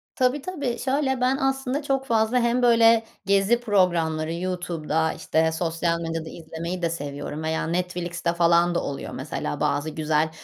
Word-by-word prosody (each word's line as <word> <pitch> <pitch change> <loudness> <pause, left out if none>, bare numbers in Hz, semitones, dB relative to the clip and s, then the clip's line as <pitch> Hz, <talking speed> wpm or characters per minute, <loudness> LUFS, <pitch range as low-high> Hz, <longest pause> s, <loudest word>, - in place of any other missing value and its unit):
Tabii, 255 +2 +1
tabii. 280 -7 -3
Şöyle 265 -1 0
ben 255 +2 +2
aslında 270 +1 -1
çok 270 -1 0
fazla 230 0 +2
hem 235 +1 +1
böyle 230 -1 +5 0.2
gezi 200 +4 +3
programları, 170 -8 +1
YouTube'da 170 -3 -1
işte 160 0 +1
sosyal 165 0 -1
medyada 165 -1 -4
izlemeyi 170 +2 -6
de 170 - +1
seviyorum 145 -1 -5
veya 160 0 -1
Netflix'te 175 0 -2
falan 170 0 +3
da - - 0
oluyor 140 - -5
mesela. 75 - -4
Bazı 145 +1 0
güzel, 155 0 0
175 Hz, 150 wpm, -24 LUFS, 160-240 Hz, 0.2 s, böyle